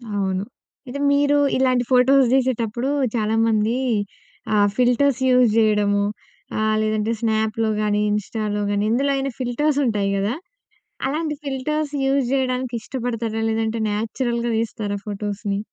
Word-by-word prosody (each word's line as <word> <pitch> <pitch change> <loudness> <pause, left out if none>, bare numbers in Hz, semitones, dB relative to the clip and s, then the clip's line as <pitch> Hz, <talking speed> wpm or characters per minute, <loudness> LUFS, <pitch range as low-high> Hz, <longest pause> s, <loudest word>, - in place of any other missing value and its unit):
అవును. 190 -1 -1 0.5
ఇది 280 +3 -5
మీరు 285 0 +3 0.2
ఇలాంటి 255 -1 +2
ఫోటోస్ 260 +2 +5
తీసేటప్పుడు 245 -1 0 0.3
చాలామంది 220 0 +1 0.8
ఆహ్, 205 -1 +4
ఫిల్టర్స్ 250 +1 +3
యూస్ 250 -2 +5
చేయడము, 210 -2 +3 0.6
ఆహ్, 215 0 +1
లేదంటే 215 0 0
స్నాప్‌లో 220 0 0
కాని, 210 0 +1
ఇన్‌స్టాలో 210 0 -2
కానీ, 205 0 0
ఎందులో 275 +4 +1
అయినా 270 0 -2
ఫిల్టర్స్ 275 +4 0
ఉంటాయి 205 -4 0
కదా? 200 +4 0 0.7
అలాంటి 305 +2 -2
ఫిల్టర్స్ 290 +2 -2
యూస్ 270 0 +2
చేయడానికి 255 -2 -1
ఇష్టపడతారా? 230 -1 -3
లేదంటే 225 0 -1
న్యాచురల్‍గా 235 +2 -2
తీస్తారా 215 -2 -2
ఫోటోస్‍ని? 205 -1 -3
230 Hz, 120 wpm, -22 LUFS, 215-260 Hz, 0.8 s, ఫోటోస్